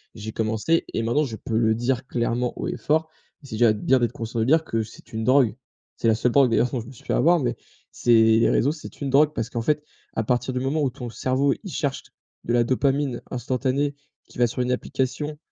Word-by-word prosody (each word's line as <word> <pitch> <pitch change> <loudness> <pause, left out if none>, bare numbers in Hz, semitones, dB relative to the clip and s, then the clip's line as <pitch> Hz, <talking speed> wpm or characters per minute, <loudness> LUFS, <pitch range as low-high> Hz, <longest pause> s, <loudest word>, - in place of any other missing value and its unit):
J'ai 110 0 -6
commencé 110 +9 0
et - - 0
maintenant 120 +7 +2
je 120 -6 -4
peux 110 - -3
le 110 -1 +3
dire 125 +2 -1
clairement 120 0 -1
haut - - -3
et - - -3
fort- 160 +1 0 0.3
et - - -12
c'est 110 - -6
déjà 115 -1 +4
bien 130 +5 +2
d'être 120 - +1
conscient, 115 +1 -4
de 110 - +2
dire- 160 +5 +4
que 115 -6 -1
c'est - - -14
une 110 0 -2
drogue. 130 -3 +4 0.4
C'est - - 0
la 110 - +4
seule 120 +2 +1
drogue 135 -2 +5
d'ailleurs 120 +2 +2
dont 125 - -2
je 115 - -11
me - - -10
suis 130 - -16
fait - - -1
avoir, 170 +6 +4
mais 120 -4 -1 0.4
c'est 120 - 0
les 110 0 +5
réseaux 140 - +2
c'est 155 -1 -10
une 140 - -2
drogue 150 +3 +4
parce 110 - -3
qu'en 115 - -3
fait 150 +5 0 0.3
à 110 - -1
partir 125 +3 0
du 125 - -1
moment 140 +4 0
où 140 - +2
ton 125 -2 -7
cerveau, 130 +4 +1
il 195 - -7
cherche 140 -1 -2 0.4
de 120 - -1
la 120 -1 +4
dopamine 135 +1 0
instantanée 130 +3 -1 0.3
qui - - -16
va 120 - +4
sur 120 +2 -3
une 125 0 0
application 135 +4 -2
125 Hz, 245 wpm, -24 LUFS, 115-140 Hz, 0.4 s, drogue